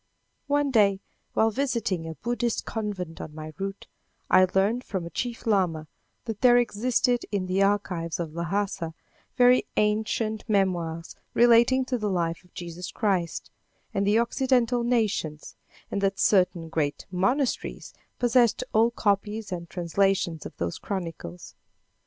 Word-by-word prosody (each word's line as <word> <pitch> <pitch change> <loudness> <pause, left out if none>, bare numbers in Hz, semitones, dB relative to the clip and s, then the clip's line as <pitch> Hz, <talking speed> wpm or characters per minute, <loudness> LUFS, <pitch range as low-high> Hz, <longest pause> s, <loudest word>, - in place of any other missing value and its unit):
One 285 -1 +1
day, 200 -5 +4 0.3
while 225 0 +3
visiting 230 -10 -1
a 160 - -6
Buddhist 240 +2 -2
convent 200 -7 -4
on 150 - -8
my 155 0 -7
route, 195 0 -4 0.5
I 185 0 +7
learned 210 +6 +2
from 190 -7 -4
a 170 - -8
chief 240 +6 -4
lama, 180 -8 +1 0.4
that 225 -3 -5
there 245 -1 +7
existed 245 +1 +1
in 200 -3 -1
the 185 +1 0
archives 185 -5 0
of 165 -3 -4
Lhassa, 170 -1 -2 0.4
very 250 0 +5
ancient 215 +1 0
memoirs 175 -5 0 0.2
relating 240 +2 +5
to 255 -1 -2
the 210 -1 -1
life 170 -2 -1
of 180 - -26
Jesus 175 0 -6
Christ 190 -6 -1 0.4
and 200 0 0
the 210 +2 +4
occidental 245 0 +2
nations, 215 -11 -1 0.4
and 200 - -1
that 195 -1 +1
certain 180 -4 +2
great 150 -3 -2
monasteries 240 +9 -1 0.2
possessed 245 -2 +3
old 230 +2 +3
copies 210 +1 0
and 170 -2 -5
translations 175 -2 0
of - - -16
those 85 0 -3
chronicles. 165 - -6
200 Hz, 140 wpm, -26 LUFS, 170-235 Hz, 0.5 s, I